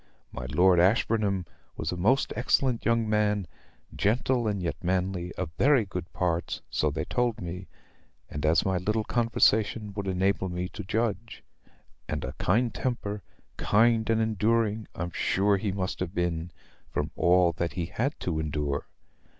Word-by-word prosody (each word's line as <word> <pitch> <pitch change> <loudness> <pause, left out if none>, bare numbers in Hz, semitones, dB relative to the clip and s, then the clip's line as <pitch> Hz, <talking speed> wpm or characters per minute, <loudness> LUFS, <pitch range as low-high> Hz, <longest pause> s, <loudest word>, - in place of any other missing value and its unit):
My 65 0 -6
Lord 90 +6 +4
Ashburnham 100 0 +2 0.3
was 80 - -2
a - - -2
most 105 +10 +2
excellent 130 -4 +1
young 115 -1 +2
man, 105 -2 +1 0.5
gentle 120 +2 +1
and 105 -2 0
yet 90 -2 -4
manly, 90 0 -1
of 90 -4 -4
very 135 -5 +4
good 90 -2 -6
parts, 85 -2 -1
so 75 - +1
they 80 +2 -3
told 120 -2 0
me, 90 0 -6 0.6
and 75 - -6
as 80 +1 +3
my 95 -1 +1
little 105 +4 0
conversation 110 -2 +2
would 100 -1 -4
enable 95 0 +1
me 90 +1 -3
to - - -7
judge: 110 +2 -2 0.7
and - - -2
a - - -5
kind 115 +6 +2
temper 105 -5 -3 0.4
kind 115 +1 +3
and 115 0 +3
enduring 110 0 +1
I'm 90 0 -4
sure 100 +4 +2
he 100 +1 -2
must 95 -1 -3
have 90 +1 -4
been, 85 -1 -1 0.4
from - - -2
all 90 0 +4
that 85 0 -1
he 85 0 -2
had 125 - -2
to 80 -3 -1
endure. 75 -2 -2
100 Hz, 160 wpm, -28 LUFS, 90-110 Hz, 0.7 s, Lord